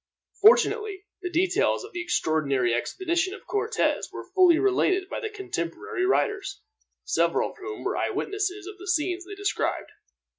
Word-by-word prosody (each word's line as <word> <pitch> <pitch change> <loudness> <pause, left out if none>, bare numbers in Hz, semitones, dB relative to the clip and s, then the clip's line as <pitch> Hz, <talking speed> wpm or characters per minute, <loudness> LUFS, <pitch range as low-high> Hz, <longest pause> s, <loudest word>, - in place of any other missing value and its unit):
Fortunately, 430 -3 +4 0.2
the 360 - -3
details 355 +2 +1
of 415 - -11
the 350 - -3
extraordinary 140 - +1
expedition 365 - -1
of - - -14
Cortez 440 +2 0
were - - -8
fully 365 -4 +6
related 380 0 +2
by - - -4
contemporary 380 - -3
writers, 395 0 0 0.4
several - - +1
of - - -19
whom 415 +2 -7
were - - -1
eyewitnesses 400 -1 -2
of 400 0 -9
the 385 - -10
scenes 355 +1 0
they 405 - -7
described. 405 +1 -2
380 Hz, 145 wpm, -26 LUFS, 350-410 Hz, 0.4 s, fully